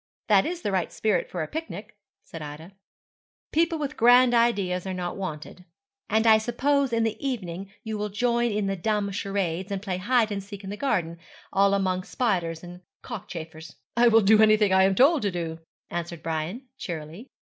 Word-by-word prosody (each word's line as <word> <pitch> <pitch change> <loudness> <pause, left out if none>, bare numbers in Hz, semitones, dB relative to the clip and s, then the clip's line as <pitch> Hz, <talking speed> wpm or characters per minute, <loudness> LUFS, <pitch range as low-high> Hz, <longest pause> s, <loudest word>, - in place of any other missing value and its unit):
'That 200 -2 +5
is 350 +1 -5
the 205 - -1
right 185 -3 -1
spirit 215 -3 0
for 175 -3 -3
a - - -5
picnic,' 225 -10 -7 0.3
said 165 - -9
Ida, 150 +4 -8 0.8
'People 330 +1 +2
with 290 -3 -4
grand 245 +1 +6
ideas 200 -6 +1
are 190 - -3
not 180 -1 -4
wanted.' 180 -1 -6 0.5
'And 220 +1 +2
I 220 -1 +7
suppose 270 +4 +1
in 230 -1 +1
the 225 +2 -2
evening 195 -8 -4
you 220 -2 -4
will 210 0 -2
join 235 +3 +1
in 210 -1 -1
the 195 0 -1
dumb 205 +1 -1
charades, 195 -2 -2
and 200 - -1
play 190 -2 -3
hide 220 +3 +2
and 200 -1 -3
seek 200 0 -10
in 190 - -6
the - - -4
garden, 175 -10 -1 0.3
all 200 0 +4
among 185 -2 0
spiders 175 -9 -1
and 175 0 -10 0.2
cockchafers.' 165 -8 -8 0.2
'I 240 +1 +5
will 225 -1 +6
do 215 +2 +5
anything 215 -2 +5
I 190 0 +6
am 195 0 +2
told 285 - +5
to 205 - 0
do,' 165 -3 -4 0.3
answered 170 -1 -5
Brian, 165 - -3
cheerily. 165 - -7
200 Hz, 190 wpm, -26 LUFS, 180-230 Hz, 0.8 s, I